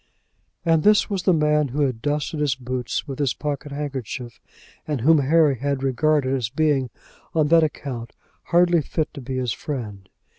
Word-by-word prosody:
And 165 -1 +3
this 210 +2 +4
was 195 -2 -1
the 185 - +3
man 150 -2 +2
who 140 +4 -2
had 130 -5 0
dusted 150 +3 -2
his 150 -2 +1
boots 125 +1 -4
with 135 -1 -6
his 140 -4 +1
pocket 145 0 -4
handkerchief, 130 -4 -5 0.5
and 145 -5 -2
whom 155 +5 +5
Harry 145 -2 +3
had 140 0 -1
regarded 135 0 +1
as 125 -4 -1
being 140 -2 +1 0.5
on 155 -2 +2
that 165 0 +6
account 130 -6 -4 0.3
hardly 175 -1 +4
fit 155 +2 -3
to 140 - -8
be 130 +1 -4
his 125 -4 -1
friend! 105 -9 -6
145 Hz, 175 wpm, -23 LUFS, 130-155 Hz, 0.5 s, that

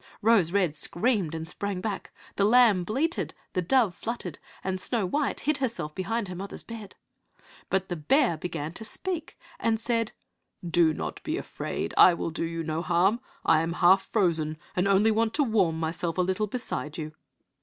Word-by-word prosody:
Rose 210 -7 +4
red 185 -6 +2
screamed 175 - +1
and 160 0 -5
sprang 200 +2 -3
back, 200 0 -4 0.2
the 200 - +1
lamb 215 -4 +5
bleated, 275 - -1 0.2
the 185 - +1
dove 220 +1 +3
fluttered, 205 -6 -5 0.2
and 190 -1 -2
Snow 230 -6 0
white 285 +10 -1
hid 300 0 +1
herself 225 - -2
behind 225 +4 -2
her 180 - -6
mother's 195 +3 -6
bed. 220 -4 -9 0.7
But 190 -1 0
the 175 - -3
bear 205 - +3
began 160 -1 -4
to 220 - -7
speak 355 +8 -4 0.2
and 225 -1 +1
said, 230 -1 0 0.6
"Do 170 -1 +4
not - - -5
be - - -2
afraid, - - -4
I 180 - +8
will 170 - -3
do 165 +1 -2
you 165 0 -3
no 160 +1 -2
harm! 180 +6 +2 0.3
I 160 -1 +5
am 165 +1 -2
half 185 +2 +4
frozen, 160 -7 +1 0.2
and 180 +2 +2
only 200 +3 +4
want 225 +1 +1
to 290 - +3
warm 195 - +2
myself 165 +1 -2
a - - +3
little 190 +4 0
beside 195 -9 -4
you." 155 -1 -5
190 Hz, 180 wpm, -27 LUFS, 170-225 Hz, 0.7 s, I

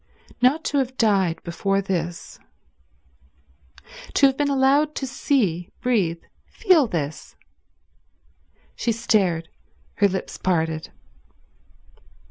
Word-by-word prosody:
Not 275 +6 +3
to 285 - +1
have 260 -1 -3
died 195 -7 +1
before 195 +3 -1
this... 175 -3 -4 1.8
to - - +5
have 270 -1 +3
been 290 +1 0
allowed 280 +3 +2
to 270 - -3
see, 205 - 0
breathe, 190 -10 0 0.2
feel 360 - +3
this.... 155 -6 -5 1.4
She 235 - -1
stared, 195 -8 +1 0.5
her 205 - +4
lips 190 -1 -5
parted. 160 -3 -1
205 Hz, 100 wpm, -23 LUFS, 170-265 Hz, 1.8 s, to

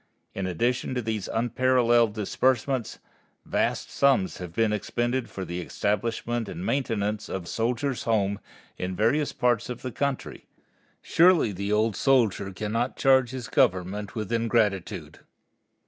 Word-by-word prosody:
In 95 -1 -3
addition 120 +8 -1
to 125 - 0
these 110 -3 -3
unparalleled 120 -2 +2
disbursements, 125 +3 0 0.5
vast - - -1
sums 135 -10 +2
have 90 -2 -6
been 110 +4 +1
expended 120 +4 -1
for 95 - -6
the 90 +1 -4
establishment 115 +4 -2
and 175 +3 -6
maintenance 110 - -1
of 90 -3 -4
Soldiers' 125 +5 -1
Homes 100 -3 +1 0.4
in 90 0 -3
various 140 +9 +1
parts 120 -2 +1
of 125 - -6
the 130 - -4
country. 140 +2 -3 0.6
Surely 170 - +4
the 100 +2 -3
old 105 0 +2
soldier 110 -7 +2
cannot 110 +6 -2
charge 130 -2 +4
his 125 -2 -6
Government 95 +3 0
with 110 -1 -4
ingratitude. 115 -5 0
115 Hz, 130 wpm, -26 LUFS, 100-125 Hz, 0.6 s, Surely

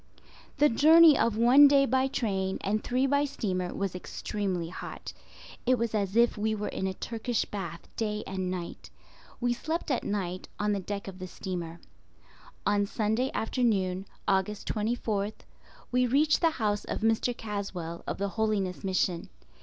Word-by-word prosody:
The 295 - +6
journey 315 +4 +7
of 230 -4 +1
one 255 +5 +8
day 280 -1 +5
by 260 0 +2
train 195 -7 -1
and 210 +2 -1
three 255 +2 +1
by 285 +1 +2
steamer 190 -10 -2
was 195 -2 -3
extremely 180 -1 -3
hot. 180 - -8 0.5
It 255 0 +4
was 230 -1 -1
as 200 -2 -1
if 235 -2 +3
we 220 +1 0
were 210 0 -3
in 190 - -2
a 190 - -3
Turkish 230 +2 -2
bath 175 -4 -6
day 210 -1 -2
and 185 -1 -3
night. 180 -2 -6 0.5
We 245 0 +1
slept 315 +5 -3
at 255 - 0
night 185 -3 -3
on 210 0 0
the 200 - 0
deck 200 +2 -5
of 190 -1 -8
the 185 - -6
steamer. 175 -3 -6 0.9
On 205 -1 +2
Sunday 220 +5 0
afternoon, 195 -6 0 0.2
Aug. 190 -1 +3
24th, 210 0 -2 0.5
we 250 0 +3
reached 295 +5 +3
the 330 - +5
house 215 -9 -1
of - - -4
Mr. 225 +2 +1
Caswell 195 -6 -5
of - - -2
the 200 +1 -1
Holiness 205 -4 -1
Mission. 185 -2 0
210 Hz, 160 wpm, -29 LUFS, 190-245 Hz, 0.9 s, one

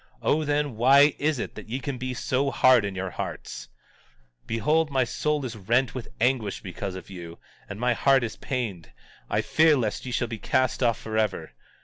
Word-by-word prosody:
O, 155 +1 +2
then, 145 -4 -1
why 140 +4 +6
is 150 0 +1
it, - - -4
that - - -10
ye 125 +4 -2
can 135 -1 -5
be 130 0 -3
so 135 +3 0
hard 130 -5 +5
in 100 -1 -4
your 95 -1 -3
hearts? - - -6 0.8
17:47 - - -34
Behold, 155 +7 +1
my 135 -2 +2
soul 150 +3 -1
is 120 -3 -5
rent 115 +5 +1
with 125 -3 -6
anguish 120 -4 0
because 95 0 -6
of 95 +1 -9
you, 85 -2 -9 0.3
and 100 - -7
my 125 0 +2
heart 135 +1 +3
is 110 -2 -4
pained; 105 - -4 0.4
I - - +1
fear 155 -1 +4
lest 110 -5 -2
ye - - -4
shall 120 0 0
be 115 -2 -6
cast 130 +4 0
off 115 -3 +2
forever. 110 -1 -2
125 Hz, 200 wpm, -26 LUFS, 105-135 Hz, 0.8 s, why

